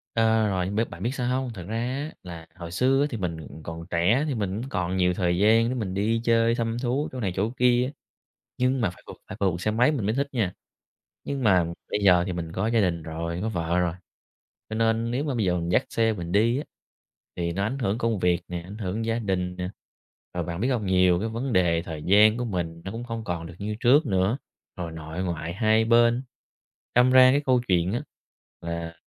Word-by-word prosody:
Ờ, 110 -1 +3
rồi, 95 -3 0
nhưng 100 +3 -4
biết 115 +2 0
bạn - - -8
biết 120 - 0
sao 125 -2 -2
hông? 125 -3 -5
Thật 95 -5 -8
ra 110 +2 -3
á 130 +6 -3
là 85 -2 -9
hồi 85 -2 -8
xưa 130 +9 +2
á 145 - +2
thì 120 - -4
mình, 90 -5 -3
ừm, 80 0 -10
còn 80 0 -7
trẻ 90 - +2
thì 140 - -1
mình 100 -1 -2
cũng 130 - -6
còn 90 -5 -1
nhiều 90 -1 +3
thời 90 -1 0
gian 110 +4 +4
để 130 - -2
mình 105 -7 -3
đi 110 +4 0
chơi, 115 0 +3
thăm 115 -1 -1
thú 130 +4 -1
chỗ 130 - -6
này 100 -6 -1
chỗ 100 +3 0
kia, 125 +1 +3 0.7
nhưng 130 +1 +1
mà 105 - +2
phải - - -18
phượt - - -9
phải - - -8
phượt 100 - +4
bằng 85 - -3
xe 105 +5 -1
máy 120 +6 +3
mình 130 -9 -2
mới 110 +3 0
thích 140 +1 0
nha. 110 -8 -1 0.7
Nhưng 140 -2 -3
mà 95 -6 +4 0.3
bây - - 0
giờ 90 -3 +6
thì 90 - -2
mình 85 -2 -5
có 95 +4 -1
gia 115 -1 +2
đình 85 -4 0
rồi, 85 +2 -4
có 110 - -1
vợ 85 -3 0
rồi, 85 -2 0 0.8
cho 110 - -4
nên 115 +1 +1
nếu 130 +4 -1
mà 140 -4 -1
bây 110 -4 0
giờ 90 -1 +2
mình 85 0 -3
dắt - - +2
xe 115 -1 +1
mình 85 -4 -6
đi 115 +5 +3
á 145 - -2 0.7
thì 85 -1 -1
nó 100 +3 -1
ảnh 125 +7 -2
hưởng 110 -4 0
công 115 -3 0
việc 90 -1 +2
nè, 90 -1 -4
ảnh 95 +5 -10
hưởng 105 +2 -3
gia 115 +1 0
đình 90 -4 -2
nè. 90 0 -3 0.7
Rồi 90 - -1
bạn 85 +1 -4
biết 120 - +1
hông? 120 -5 0
Nhiều 90 -2 +4
cái 110 +4 -2
vấn 120 +3 -3
đề 85 -3 +3
thời 80 -3 -7
gian 105 +3 +5
của 125 - -2
mình 85 -6 -3
nó 95 - -4
cũng 115 +3 -5
không 115 -2 -5
còn 85 -4 -4
được 85 - -11
như 105 +1 -3
trước 140 +7 +5
nữa, 95 +3 +1 0.4
rồi 85 -2 -4
nội 80 +2 -5
ngoại 85 -2 -3
hai 110 +2 +3
bên, 120 +2 +4 0.7
đâm 125 +1 +5
ra 130 0 +8
cái 140 +2 +2
câu 130 -2 +3
chuyện 90 0 +2
á 120 - -1 0.6
là 85 0 -5
105 Hz, 245 wpm, -26 LUFS, 90-115 Hz, 0.8 s, ra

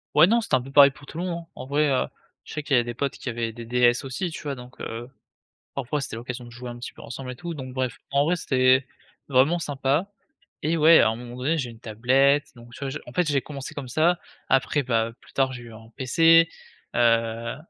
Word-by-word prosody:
Ouais, 155 +4 +8
non 235 +3 +3
c'était 215 - +1
un 130 - +1
peu 135 +2 -10
pareil 140 0 +8
pour 140 +1 -16
tout 155 - -10
le - - -2
monde, 170 -2 -4
en - - -7
vrai, 145 +3 +2
heu, 130 - +2 0.4
je - - -12
sais 155 - -4
qu'il 140 - +1
y - - +6
a - - +1
des 120 0 -5
potes 140 +3 -2
qui - - -5
avaient 115 -1 -3
des 120 0 -8
DS 120 +2 +3
aussi, 135 +7 -3
tu 160 - -8
vois? 145 -2 -3
Donc 125 0 -12
heu, 115 +1 -5 0.7
parfois 140 +2 -2
c'était 115 - -5
l'occasion 125 +1 -6
de 120 - -11
jouer 125 +1 -8
un 120 - -7
petit 120 - -7
peu - - -14
ensemble 130 +1 -7
et - - -8
tout, 170 +4 -5
donc 130 -3 -7
bref 130 -2 -2
en 140 +1 +3
vrai 175 +3 +2
c'était 130 -3 +3 0.4
vraiment 140 +6 +4
sympa 145 +5 -1 0.5
et 160 +3 +1
ouais 160 +1 +7
à - - +5
un 110 - 0
moment 120 +1 -9
donné 145 +6 0
j'ai 130 -5 -2
eu - - -9
une 115 - -15
tablette, 130 +6 +2
donc 120 0 -14
tu - - -11
vois? 135 - -2
Je 140 - -4
en 120 - -10
fait 180 - +2
j'ai 140 -2 +2
commencé 140 -2 -7
comme 140 -3 -6
ça, 165 +7 +2 0.3
après 135 +2 +2
bah, 115 -2 0
plus - - -19
tard 135 -1 +1
j'ai 125 -1 -8
eu 115 - -11
un 110 0 -13
PC, 165 +5 +5 0.5
heu, 115 -1 +2
130 Hz, 260 wpm, -25 LUFS, 120-150 Hz, 0.7 s, Ouais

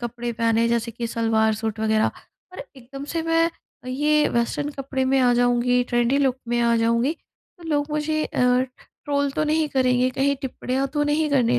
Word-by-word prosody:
कपड़े 240 0 -4
पहने 230 0 +1
हैं 230 - +2
जैसे 235 0 0
कि 235 +1 -5
सलवार-सूट 220 -1 0
वगैरह। 220 0 +2 0.4
पर 365 - -12 0.2
एकदम 275 +2 -9
से 330 - 0
मैं 330 0 +2 0.4
अ, - - -12
ये 300 +3 +2
वेस्टर्न 235 +5 -1
कपड़े 265 -1 -2
में 270 +1 +2
आ 250 -1 +4
जाऊँगी 245 0 +2
ट्रेंडी 240 +3 +2
लुक 265 -2 +1
में 240 0 +1
आ 235 0 +3
जाऊँगी, 235 +5 +1 0.5
तो 340 - -14
लोग 290 0 0
मुझे 305 +1 -1
अ, - - -3 0.6
ट्रोल 285 -1 0
तो 305 - 0
नहीं 310 0 +1
करेंगे, 255 -1 +2
कहीं 275 +2 0
टिप्पणियाँ 265 +1 -2
तो 295 - +1
नहीं 300 +1 0
करने 240 - +2
255 Hz, 185 wpm, -23 LUFS, 235-290 Hz, 0.6 s, आ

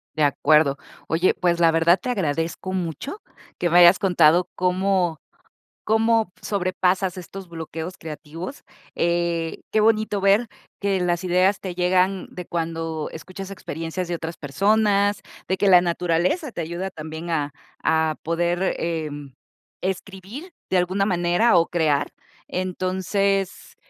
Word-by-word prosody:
De 155 - +1
acuerdo. 145 0 +3 0.3
Oye, 170 +3 +2
pues, 175 -1 0
la 165 -1 +5
verdad, 165 +3 +4
te 250 - -4
agradezco 165 -3 -2
mucho 185 - -4 0.4
que 175 - 0
me 175 +2 +6
hayas 175 +2 +8
contado 180 -2 +4
cómo 185 -2 +1 0.6
cómo 225 -2 +2
sobrepasas 185 -1 0
estos 185 0 -9
bloqueos 165 +2 -6
creativos. 165 - -8 0.3
Eh, 170 -1 0
qué 215 - +2
bonito 215 -2 +2
ver 200 +4 +4 0.3
que 195 -2 0
las 175 0 0
ideas 185 +2 +2
te 185 -2 -5
llegan 185 +1 +1
de 180 -1 -7
cuando 165 -2 -3
escuchas 185 +4 -8
experiencias 170 -1 -5
de 175 - -2
otras 165 0 -6
personas, 200 +7 +2 0.3
de 190 - +1
que 200 - +2
la 180 -2 +8
naturaleza 180 - 0
te 175 - -4
ayuda 170 +4 -4
también 160 +1 -7
a 150 -3 -1 0.3
a 160 -1 +2
poder, 175 +3 0
em, 150 -5 -4 0.5
escribir 195 - -5 0.2
de 190 - +4
alguna 185 +2 +1
manera 175 +4 +3
o 165 - +3
crear. 155 -4 0 0.3
Entonces, 185 +1 -1
180 Hz, 135 wpm, -23 LUFS, 165-195 Hz, 0.6 s, hayas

